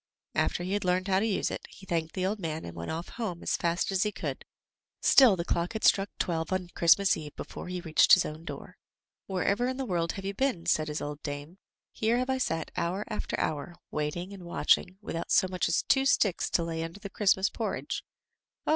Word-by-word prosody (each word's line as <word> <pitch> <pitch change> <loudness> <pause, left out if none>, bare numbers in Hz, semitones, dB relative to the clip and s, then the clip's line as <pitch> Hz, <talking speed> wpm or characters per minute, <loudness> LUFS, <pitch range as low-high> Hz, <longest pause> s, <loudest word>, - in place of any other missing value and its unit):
After 175 - 0
he 185 +2 -2
had 205 - 0
learned 185 +1 +1
how 190 0 +4
to 210 - +1
use 205 - 0
it, - - -5
he 195 - -14
thanked 165 -3 -2
the 185 -1 0
old 205 +3 -1
man 160 -3 -4
and 85 - -8
went 85 0 -5
off 165 +2 -4
home 200 -8 -4
as - - +1
fast 170 +3 0
as 190 -1 +1
he 210 - +2
could; - - -5 0.5
still 255 -7 +7
the 170 -2 -3
clock 170 +4 -1
had 220 - -4
struck 195 0 +4
twelve 165 -1 -1
on 185 -2 -1
Christmas 190 +4 +4
eve 150 -2 -8
before - - -7
he 180 0 -4
reached 160 -3 +5
his 185 - +7
own 155 +2 -6
door. - - -8 0.5
"Wherever 200 +5 +1
in 260 0 -2
the 270 - -2
world 170 -6 0
have 195 - -7
you 195 - -2
been?" 225 -8 0
said 155 -2 +2
his 150 0 -3
old 145 0 -5
dame. 145 +5 -6 0.3
"Here 225 +2 +1
have 255 +1 0
I 260 - 0
sat 165 -10 -1
hour 185 +5 -1
after - - -3
hour, 155 +3 -2 0.2
waiting 160 +6 -3
and 195 - -9
watching, 180 +1 +1
with 205 - -5
out 165 - -4
so 185 - +4
much 185 -1 -1
as - - +2
two 270 0 +3
sticks 200 -9 +2
to 170 - +1
lay 165 -1 -3
under 165 +4 -6
the 200 - -6
Christmas 195 -1 +2
porridge." - - -3 0.6
"Oh!" - - -2
180 Hz, 230 wpm, -29 LUFS, 165-200 Hz, 0.6 s, still